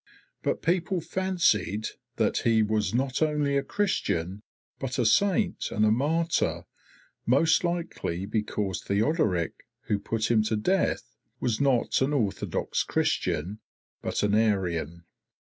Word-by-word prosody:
But - - -1
people 175 +2 +1
fancied 165 - 0 0.3
that - - +1
he 115 -2 +3
was 105 0 0
not 130 +3 -1
only 150 -2 +1
a 140 - +3
Christian, 100 - -1 0.4
but 135 -1 -3
a 120 - +1
saint 200 - +2
and 105 - +1
a 105 - +4
martyr, 160 +8 +1 0.6
most 160 +8 +4
likely 170 - -2
because 105 -3 -2
Theodoric, 100 - +1 0.3
who 105 - -1
put 115 +2 -1
him 110 -2 +4
to 110 - 0
death, 185 - 0 0.2
was 120 -1 0
not 135 -3 +2
an 135 +3 +1
orthodox 105 -9 -1
Christian, 95 +8 -1 0.4
but - - -2
an 105 0 +2
Arian. 90 -7 0
115 Hz, 130 wpm, -27 LUFS, 105-160 Hz, 0.6 s, a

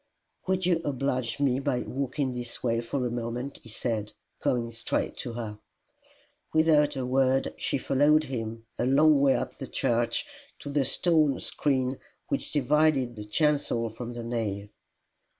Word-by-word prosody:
"Would 185 -1 +1
you 175 -2 +2
oblige 130 -5 -1
me 135 -2 +2
by 135 -3 0
walking 135 0 -2
this 120 -1 -6
way 115 -1 +1
for 125 +2 -2
a 120 - -1
moment?" 120 +3 -4
he 115 - -12
said, 110 -2 -3 0.3
coming 120 -2 0
straight 115 0 -1
to 120 - -4
her. 110 -3 -5 1.0
Without 155 -2 +4
a 130 -2 -2
word 130 +1 +2
she - - -1
followed 145 +4 +3
him, 115 -4 -5
a - - +1
long 150 +2 +5
way 140 -1 +5
up - - -2
the - - -5
church, 115 0 0 0.3
to 145 - -8
the 140 -2 +2
stone 155 -4 +2
screen 130 -2 0 0.3
which - - -2
divided 145 -3 +2
the 105 -1 -7
chancel 140 -2 +1
from 120 +2 -6
the 120 -1 -6
nave. 105 -4 -3
130 Hz, 155 wpm, -28 LUFS, 115-145 Hz, 1.0 s, long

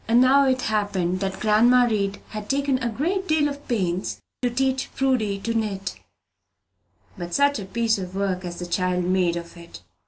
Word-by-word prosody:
Now 255 +4 +5
it 260 -1 +1
happened 200 -4 0
that 190 -1 -3
grandma 240 +4 +5
Read 205 -3 -1
had 210 -1 -7
taken 275 -1 +1
a 235 - 0
great 355 - -1
deal 310 -2 +3
of 285 0 -7
pains 190 -6 -1 0.2
to 250 - +1
teach 265 +2 0
Prudy 245 -7 +1
to 230 - -2
knit; 205 -4 -3 1.2
but 175 0 -4
such 285 -2 +3
a 200 - -6
piece 225 +2 0
of 185 0 -6
work 190 -2 -1
as 175 -1 -6
the 175 - -5
child 180 0 0
made 180 -1 +1
of 170 0 -7
it! 170 - -12
215 Hz, 180 wpm, -24 LUFS, 185-255 Hz, 1.2 s, Now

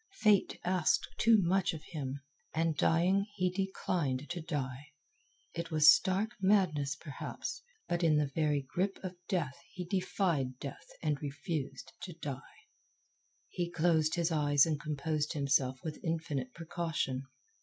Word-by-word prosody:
Fate 210 -3 +4
asked 180 -2 +2
too 230 0 +6
much 185 -1 +2
of 155 - -9
him. 140 -4 -4 0.3
And, 165 0 +1
dying, 180 +7 +3
he 185 -2 +1
declined 175 -7 -1
to 175 - -3
die. 145 -3 -4 0.7
It 170 0 -4
was 155 0 +8
stark 195 +6 +1
madness, 170 -8 +3
perhaps, 150 -3 -6 0.3
but 175 0 0
in 155 -2 +5
the 145 -2 +1
very 150 -3 +1
grip 190 +7 -1
of 185 -1 -5
Death 150 -8 -1
he 180 -1 -6
defied 170 -8 0
Death 140 +1 -8 0.2
and 150 -3 0
refused 140 -2 -4
to 180 - -6
die. 140 -5 -5 1.1
He 175 -1 -3
closed 160 -2 +2
his 170 -1 +1
eyes 145 -3 +4
and 155 -3 -1
composed 150 0 -1
himself 140 -3 +2
with 155 -2 -5
infinite 155 -6 -2
precaution. 165 -6 -2
160 Hz, 140 wpm, -33 LUFS, 145-180 Hz, 1.1 s, was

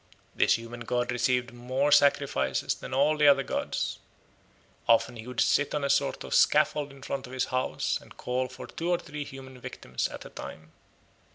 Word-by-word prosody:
This - - +4
human 115 +1 -7
god 120 +1 -1
received 125 0 +1
more 130 +4 0
sacrifices 100 - +3
than - - -9
all 140 +4 +3
the 150 -1 +5
other 140 -1 +6
gods; - - -2 0.9
often 115 +1 +4
he 115 +1 -9
would 125 -2 -5
sit 145 +1 +3
on 150 - -1
a 140 - +2
sort - - +1
of - - -5
scaffold 145 -1 +4
in 135 -1 -14
front 135 -1 -4
of 125 - -11
his 130 0 0
house 130 0 0
and - - -16
call 130 +1 -1
for - - -9
two 170 +1 -4
or 175 - +3
three 150 -4 -6
human 130 -2 -10
victims 65 - -4
at - - -9
a - - -10
time. 80 +1 -9
130 Hz, 190 wpm, -28 LUFS, 120-140 Hz, 0.9 s, other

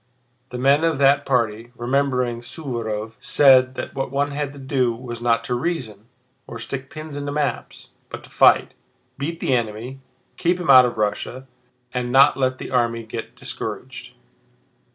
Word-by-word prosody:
The 125 - -6
men 140 +4 +3
of 165 -3 +1
that 140 +1 +3
party, 115 -2 0
remembering 125 -1 0
Suvórov, 115 -6 -5
said 130 -2 +5
that - - -6
what 135 0 -3
one 140 +2 -1
had 145 -1 -3
to - - -12
do 130 -3 0
was 120 -1 -8
not 115 -1 +2
to - - -3
reason, 120 - -3 0.4
or 115 - -7
stick 130 +3 -6
pins 155 -2 -8
into 145 0 -4
maps, 145 -2 -3 0.2
but - - -8
to - - -16
fight, - - +4 0.5
beat 165 +4 -4
the 135 - 0
enemy, 120 +2 -3 0.4
keep 175 +1 +1
him 175 -5 +2
out 130 -1 +9
of 120 - -3
Russia, 110 +5 -2 0.5
and 125 -1 -2
not 135 +3 +6
let 130 -1 0
the - - -8
army 115 -2 0
get 115 0 -7
discouraged. - - -7
130 Hz, 165 wpm, -22 LUFS, 120-140 Hz, 0.5 s, out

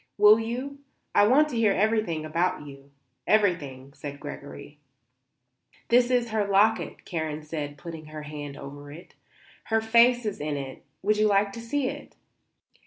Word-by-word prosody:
"Will 210 +1 +7
you? 255 +5 -4 0.3
I 205 - +5
want 290 +6 +5
to 255 - -5
hear 220 -3 +3
everything 205 -7 0
about 165 0 -1
you; 140 -1 -12 0.4
everything," 145 -11 +1
said 145 -2 -8
Gregory. 145 0 -9 1.1
"This 245 +1 +4
is 245 -2 +1
her 215 -1 +1
locket," 205 +3 +2
Karen 155 -3 -4
said, 150 -2 -5
putting 160 -1 -9
her 155 0 -8
hand 145 -1 -7
over 145 +1 -10
it. 170 +5 -13 0.5
"Her 225 0 +1
face 235 +2 +4
is 210 -2 -3
in 150 0 -2
it; 135 -1 -7 0.2
would 210 +2 +2
you 215 0 +3
like 200 0 +2
to 230 - -7
see 260 +4 -1
it?" - - -7
185 Hz, 160 wpm, -26 LUFS, 150-225 Hz, 1.1 s, Will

